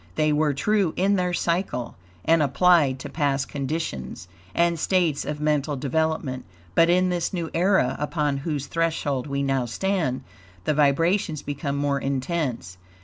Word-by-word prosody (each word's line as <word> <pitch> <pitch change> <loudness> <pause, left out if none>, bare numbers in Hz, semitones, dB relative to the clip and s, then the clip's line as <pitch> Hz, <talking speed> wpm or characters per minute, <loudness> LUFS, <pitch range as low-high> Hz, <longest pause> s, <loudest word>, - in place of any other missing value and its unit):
They 155 +4 +2
were 150 -1 +1
true 195 +2 +1
in 195 +2 +3
their 180 -1 0
cycle, 170 -8 -1 0.3
and 165 0 +4
applied 145 -1 +4
to - - -6
past 140 -3 0
conditions 135 - -4 0.3
and 170 -1 +2
states 170 -5 +1
of 150 0 -4
mental 150 -1 0
development. 140 -1 -1 0.3
But 165 - +4
in 185 +1 +3
this 175 -2 -1
new 170 -3 -3
era, 180 -7 +2
upon 150 -1 -1
whose 145 -1 -3
threshold 155 -5 -1
we 140 0 -1
now 135 -2 0
stand, 170 - -1 0.4
the 155 - +1
vibrations 155 +3 +2
become 140 0 -3
more 140 -1 0
intense. 135 - -3
150 Hz, 145 wpm, -24 LUFS, 140-170 Hz, 0.4 s, and